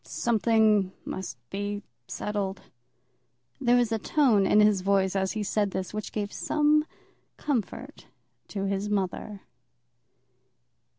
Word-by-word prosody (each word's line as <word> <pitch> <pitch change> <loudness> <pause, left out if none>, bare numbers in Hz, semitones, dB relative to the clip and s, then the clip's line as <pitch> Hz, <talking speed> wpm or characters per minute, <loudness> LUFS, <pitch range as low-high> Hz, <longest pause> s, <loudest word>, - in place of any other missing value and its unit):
Something 220 -4 +2
must 185 -10 -5
be 205 +1 -3 0.2
settled." 200 -2 -3 1.0
There 240 +1 +3
was 240 -2 +2
a 225 - 0
tone 225 -8 +3
in 210 - +5
his 210 -2 +4
voice 195 0 +2
as 190 -1 0
he 215 -1 -2
said 205 0 0
this 190 0 -4
which 215 0 -4
gave 205 -1 -3
some 300 0 +2 0.5
comfort 275 - -4 0.4
to 195 -2 -3
his 195 +1 -1
mother. 200 0 -2
205 Hz, 120 wpm, -27 LUFS, 195-225 Hz, 1.0 s, in